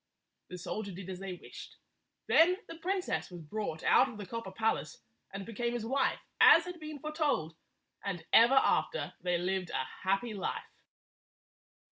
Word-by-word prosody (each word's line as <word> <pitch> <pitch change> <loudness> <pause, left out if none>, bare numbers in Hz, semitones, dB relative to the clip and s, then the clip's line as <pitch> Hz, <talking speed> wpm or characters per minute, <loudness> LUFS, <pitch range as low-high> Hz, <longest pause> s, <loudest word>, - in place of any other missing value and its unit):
The 180 - -6
soldier 200 +3 -4
did 190 +1 -7
as 180 - -6
they 195 -1 -5
wished. 175 - -11 0.5
Then 355 +3 +5
the - - -7
princess 370 +2 -1
was 175 -1 -9
brought 160 -1 -4
out 260 +2 +5
of 235 - -9
the 205 - -6
copper 230 0 -6
palace 220 +3 -1 0.3
and 195 0 -6
became 235 +1 -2
his 235 -2 -3
wife, 270 +4 +1 0.2
as 330 - +8
had 360 -1 -7
been 310 -1 -7
foretold, 290 - -1 0.5
and 180 -5 -4
ever 235 +4 +7
after 375 - +2
they 180 -1 +1
lived 185 0 -1
a 130 - -1 0.2
happy 195 +5 0
life. 195 -2 -3
215 Hz, 160 wpm, -32 LUFS, 185-275 Hz, 0.5 s, as